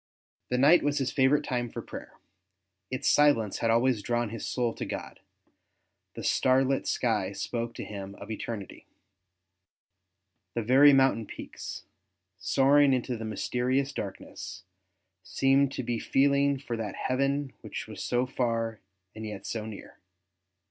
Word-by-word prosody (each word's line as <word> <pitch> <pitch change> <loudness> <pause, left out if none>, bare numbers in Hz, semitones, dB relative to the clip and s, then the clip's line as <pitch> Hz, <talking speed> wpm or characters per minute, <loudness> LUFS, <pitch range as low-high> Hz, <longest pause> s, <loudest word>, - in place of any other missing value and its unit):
The 125 - +1
night 150 +7 +6
was 145 0 0
his 135 -1 0
favourite 135 +2 +3
time 120 -3 -2
for - - -6
prayer; - - -9 0.8
its 130 +2 -2
silence 130 -9 +4
had 115 - +1
always 120 0 +3
drawni 120 0 -1
his 115 - -5
soul 120 -2 0
to - - -5
God; - - -6 1.0
the - - -6
starlit 130 +1 +2
sky 105 -5 0
spoke 115 +2 -4
to - - -5
him 100 -1 -7
of 100 +2 -9
eternity. 110 -3 -6 1.7
The 115 - 0
very 135 +6 +7
mountain 135 -5 +3
peaks, - - -8 0.6
soaring 140 +4 +4
into 125 0 -1
the 110 -1 -6
mysterious 125 +5 -1
darkness, 95 -1 -7 0.6
seemed 135 +7 +2
to 130 - -3
be 120 -1 -2
feeling 140 +2 +2
for 130 -3 -5
that 110 -3 -4
heaven 135 +1 -1
which - - -6
was - - -7
so 125 +1 +1
far 115 -3 -1 0.3
and 110 - -8
yet 105 -3 -6
so 110 -2 -4
near. 105 -2 -10
125 Hz, 140 wpm, -28 LUFS, 110-135 Hz, 1.7 s, very